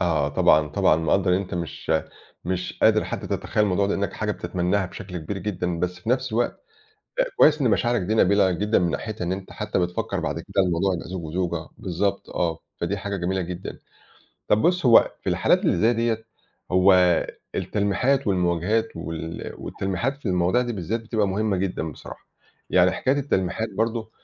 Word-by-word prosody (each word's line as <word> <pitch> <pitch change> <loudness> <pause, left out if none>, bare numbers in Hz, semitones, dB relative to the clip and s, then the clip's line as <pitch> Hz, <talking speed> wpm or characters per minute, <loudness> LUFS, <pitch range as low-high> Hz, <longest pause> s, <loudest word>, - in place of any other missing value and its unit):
آه 80 -6 +1
طبعًا 75 +1 +4
طبعًا 75 - +3
مقدَّر 90 +4 +1
إن - - 0
أنت 100 - -6
مش 85 -2 -3 0.5
مش 90 +1 -3
قادر - - +5
حتّى - - -5
تتخيل 105 - -1
الموضوع 100 0 +1
ده 100 - 0
لأنّك 100 0 -2
حاجة 105 -1 -2
بتتمناها 90 +1 -1
بشكل 90 0 -7
كبير 90 +5 -5
جدًا، 90 -3 -3
بس 90 +1 -2
في 110 - -10
نَفس 130 -1 0
الوقت 120 +2 0 0.6
أ - - +6
كويّس 150 0 +5
إن 125 -4 +3
مشاعرك 120 +2 +2
دي 105 +5 -1
نبيلة 100 -2 +4
جدًا 105 +5 +1
من 90 -1 +1
ناحيتها 110 +1 -4
إن 85 - -1
أنت 95 0 -6
حتّى - - -2
بتفكَّر 90 +3 -1
بعد 80 -1 -2
كده 95 +3 0
الموضوع 90 +1 +1
يبقي 85 - -6
زوج 90 -1 -5
وزوجة 85 0 -3
بالضبط 100 +3 -2
آه، 85 -2 -1 0.2
فدي 85 +4 -1
حاجة 100 0 -4
جميلة 95 +1 -1
جدًا. 90 +1 -6 0.7
طَب 105 - +3
بُص 180 -3 +2
هو 115 -2 +6
في - - -1
الحالات - - +3
اللي - - +3
زي 115 +6 +4
دِيَّة 115 -1 -1 0.5
هو 95 +2 +6 0.6
التلميحات 125 +7 0
والمواجهات 90 +4 +1
وال 80 0 -6
والتلميحات 95 +8 -2
في 145 - -10
المواضيع 90 +5 +2
دي 120 -1 -3
بالذات 105 +3 -3
بتبقى 110 -2 0
مهمة 100 +1 0
جدًا 90 -4 -2
بصراحة. - - -12 0.4
يعني 90 0 +5
حكاية 130 +9 0
التلميحات 110 -5 -1
برضه 115 0 -1
95 Hz, 180 wpm, -24 LUFS, 90-110 Hz, 0.7 s, أ